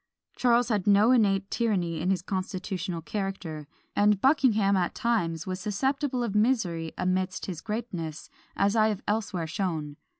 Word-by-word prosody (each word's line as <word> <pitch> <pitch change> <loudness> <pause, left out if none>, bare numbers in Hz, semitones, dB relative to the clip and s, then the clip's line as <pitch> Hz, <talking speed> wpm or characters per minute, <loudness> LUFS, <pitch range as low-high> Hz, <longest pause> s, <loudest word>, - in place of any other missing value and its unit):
Charles 245 -1 +3
had 210 -4 0
no 205 +4 +6
innate 200 -5 +2
tyranny 180 -9 0
in 180 - 0
his 185 -2 0
constitutional 185 -2 -3
character; 170 -4 -4 0.3
and 205 -1 +4
Buckingham 220 -7 +3
at 180 -2 0
times 170 -9 0
was 185 0 -4
susceptible 255 +6 -1
of 225 -4 -2
misery 205 -8 +1
amidst 185 +1 -1
his 175 -4 -5
greatness, 180 -8 -5 0.3
as 200 +2 +2
I 215 -1 +4
have 210 -3 -2
elsewhere 205 -5 -1
shown. 160 -4 -3
195 Hz, 145 wpm, -27 LUFS, 175-220 Hz, 0.3 s, no